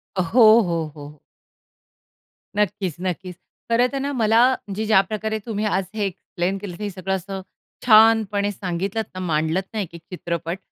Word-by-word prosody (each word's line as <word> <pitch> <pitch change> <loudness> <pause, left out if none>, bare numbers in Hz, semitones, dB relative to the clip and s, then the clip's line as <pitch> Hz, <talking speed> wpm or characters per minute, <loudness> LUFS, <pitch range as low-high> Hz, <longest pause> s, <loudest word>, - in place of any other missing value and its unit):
अ, 185 - +1
हो, 200 +9 +2 0.2
हो, 170 -4 -1
हो. 145 0 -11 1.4
नक्कीच-नक्कीच. 185 -2 -2 0.4
खरं 245 +2 +4
तर 275 - -1
ना 285 - -1
मला 225 +1 +4
म्हणजे 210 -3 -5
ज्या 190 - +7
प्रकारे 220 +1 -2
तुम्ही 215 -2 -2
आज 195 - +1 0.2
हे 205 - +1
एक्सप्लेन 185 0 -3
केलं 185 -4 -6
हे 205 - -2
सगळं 190 0 -2
असं 190 +1 -5 0.4
छानपणे 215 -3 +5
सांगितलत 190 +3 -3
ना, 185 - -6
मांडलत 160 +4 +1
ना 220 - -2
एक-एक 170 0 -13
चित्रपट. 170 0 -4
195 Hz, 150 wpm, -22 LUFS, 175-215 Hz, 1.4 s, ज्या